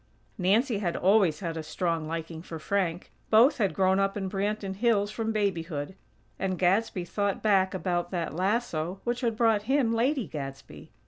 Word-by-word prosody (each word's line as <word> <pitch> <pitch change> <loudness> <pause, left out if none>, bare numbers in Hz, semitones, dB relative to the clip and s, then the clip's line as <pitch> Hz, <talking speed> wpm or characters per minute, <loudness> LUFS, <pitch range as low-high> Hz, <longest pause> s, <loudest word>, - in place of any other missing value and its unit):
Nancy 210 +5 +2
had 175 -4 -1
always 185 -5 +3
had 165 -3 -3
a 160 - -3
strong 165 0 -2
liking 165 0 -5
for 165 -1 -7
Frank. 175 +1 -2 0.2
Both 240 +6 +5
had 200 -4 +1
grown 190 0 +3
up 195 +1 0
in 190 -2 -3
Branton 200 -1 -2
Hills 210 -2 +2
from 225 0 -2
babyhood; 175 -7 -2 0.5
and 190 -1 -1
Gadsby 185 0 +1
thought 200 +2 -2
back 195 -3 +3
about 175 -1 -1
that 170 -5 -3
lasso 185 -2 -1
which 240 +1 -2
had 230 -3 0
brought 225 -3 +3
him 265 -5 +3
Lady 255 +2 +1
Gadsby. 135 -2 -8
195 Hz, 170 wpm, -28 LUFS, 170-215 Hz, 0.5 s, Both